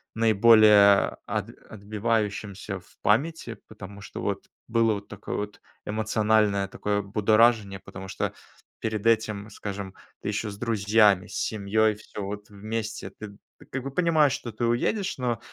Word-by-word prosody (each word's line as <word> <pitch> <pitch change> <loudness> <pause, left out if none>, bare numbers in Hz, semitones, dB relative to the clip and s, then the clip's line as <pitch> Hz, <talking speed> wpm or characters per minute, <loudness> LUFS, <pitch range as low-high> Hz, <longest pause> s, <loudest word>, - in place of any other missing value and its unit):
наиболее 110 -2 +6
от - - -3 0.2
отбивающимся 105 -2 -2
в 90 - -23
памяти. 120 +1 0
Потому 100 -2 -10
что - - -8
вот 100 -1 -3 0.2
было 115 -1 +3
вот 100 0 -6
такое 105 0 -6
вот 105 0 -5 0.2
эмоциональное 105 -2 +1
такое 105 0 -1
будоражение, 105 0 +3
потому 95 0 -10
что - - -3 0.5
перед 110 -1 -3
этим, 110 -2 +1
скажем, 100 -3 -6 0.3
ты - - -3
ещё 105 +1 -2
с 100 - -10
друзьями, 105 -3 +3
с - - -9
семьёй, 110 +1 +1
всё 105 -1 -8
вот 105 +1 -6
вместе. 105 -1 -5
Ты 100 0 -10 0.2
ты - - -15
как 135 -1 -5
бы 135 - -5
понимаешь, 155 -4 +3
что 120 - -5
ты 115 +3 -2
уедешь, 185 - 0
но 120 -3 -1
105 Hz, 145 wpm, -26 LUFS, 100-115 Hz, 0.5 s, наиболее